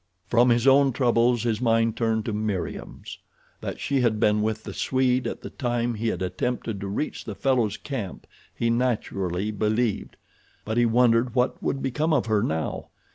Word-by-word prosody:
From 120 Hz, +1 st, +4 dB
his 120 Hz, +1 st, +3 dB
own 135 Hz, 0 st, +5 dB
troubles 120 Hz, -2 st, +2 dB
his 115 Hz, -1 st, -1 dB
mind 115 Hz, -2 st, +2 dB
turned 110 Hz, -2 st, 0 dB
to 115 Hz, -, -2 dB
Meriem's. 105 Hz, -3 st, -4 dB, 0.4 s
That -, -, -5 dB
she 140 Hz, -2 st, 0 dB
had 110 Hz, -3 st, +1 dB
been 105 Hz, -1 st, +3 dB
with 110 Hz, 0 st, -1 dB
the -, -, -7 dB
Swede 130 Hz, -1 st, +1 dB
at -, -, -5 dB
the -, -, -8 dB
time 120 Hz, -2 st, -1 dB
he 115 Hz, +1 st, -3 dB
had 110 Hz, -, -1 dB
attempted 115 Hz, +2 st, -3 dB
to 100 Hz, -, -4 dB
reach 100 Hz, +10 st, -3 dB
the 105 Hz, -, -6 dB
fellow's 120 Hz, -6 st, +1 dB
camp 120 Hz, -, -6 dB, 0.3 s
he 115 Hz, 0 st, -1 dB
naturally 105 Hz, -5 st, -1 dB
believed; 110 Hz, +1 st, -1 dB, 0.5 s
but 110 Hz, +1 st, -2 dB
he 120 Hz, 0 st, +4 dB
wondered 120 Hz, +1 st, +3 dB
what 125 Hz, 0 st, +1 dB
would 135 Hz, -, -2 dB
become 150 Hz, +5 st, 0 dB
of 150 Hz, -, +2 dB
her 110 Hz, -2 st, +2 dB
now. 80 Hz, -3 st, -2 dB
115 Hz, 180 wpm, -25 LUFS, 110-125 Hz, 0.5 s, own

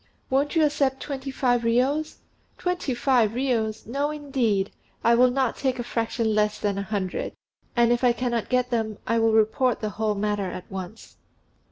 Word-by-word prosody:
"Won't 280 Hz, +4 st, +1 dB
you 320 Hz, -2 st, +5 dB
accept 280 Hz, -2 st, +1 dB
twenty 275 Hz, -2 st, -5 dB
five 250 Hz, -2 st, +1 dB
riyos?" 260 Hz, +7 st, +1 dB, 0.4 s
"Twenty 360 Hz, -8 st, -1 dB
five 240 Hz, -4 st, +2 dB
riyos! 230 Hz, -4 st, -1 dB
No, 280 Hz, +6 st, -1 dB
indeed! 260 Hz, -10 st, 0 dB, 0.3 s
I 235 Hz, -, +5 dB
will 250 Hz, +2 st, +5 dB
not 260 Hz, -1 st, 0 dB
take 260 Hz, -2 st, 0 dB
a 240 Hz, -, -3 dB
fraction 230 Hz, -1 st, -1 dB
less 210 Hz, 0 st, +1 dB
than 200 Hz, -1 st, -1 dB
a -, -, -1 dB
hundred; 200 Hz, -2 st, -3 dB, 0.4 s
and 235 Hz, -1 st, +4 dB
if 240 Hz, +1 st, +1 dB
I 245 Hz, -, +6 dB
cannot 235 Hz, -1 st, -2 dB
get 250 Hz, 0 st, +1 dB
them 220 Hz, -3 st, -1 dB
I 230 Hz, +1 st, +1 dB
will 225 Hz, 0 st, +3 dB
report 220 Hz, +3 st, +2 dB
the 215 Hz, -, -2 dB
whole 215 Hz, +1 st, -1 dB
matter 205 Hz, -1 st, -1 dB
at 180 Hz, 0 st, -7 dB
once." 190 Hz, +3 st, -8 dB
235 Hz, 180 wpm, -25 LUFS, 215-265 Hz, 0.4 s, I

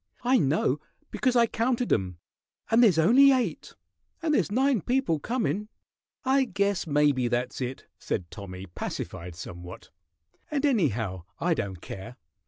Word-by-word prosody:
I 250 Hz, +1 st, +4 dB
know, 140 Hz, -2 st, +1 dB, 0.3 s
because 255 Hz, -2 st, +1 dB
I 235 Hz, -1 st, +6 dB
counted 240 Hz, +2 st, 0 dB
'em, 90 Hz, -4 st, -1 dB, 0.5 s
and 225 Hz, +2 st, +6 dB
there's 205 Hz, -9 st, +5 dB
only 250 Hz, -, +7 dB
eight, 255 Hz, -2 st, -1 dB, 0.5 s
and 315 Hz, -2 st, +1 dB
there's 245 Hz, -, +1 dB
nine 260 Hz, -1 st, +2 dB
people 245 Hz, -, +1 dB
comin'." 210 Hz, -, -1 dB, 0.6 s
"I 265 Hz, +1 st, +3 dB
guess 200 Hz, -4 st, -1 dB
maybe 145 Hz, -4 st, +2 dB
that's 120 Hz, +2 st, -2 dB
it," 130 Hz, +1 st, -4 dB
said 85 Hz, -, -3 dB
Tommy, 95 Hz, -2 st, -8 dB
pacified 85 Hz, -1 st, -6 dB
somewhat. 90 Hz, -1 st, -9 dB, 0.6 s
"And 295 Hz, -1 st, 0 dB
anyhow, 115 Hz, -, 0 dB
I 175 Hz, 0 st, +2 dB
don't 95 Hz, -, -4 dB
care. 110 Hz, +6 st, -8 dB
165 Hz, 140 wpm, -27 LUFS, -, 0.6 s, only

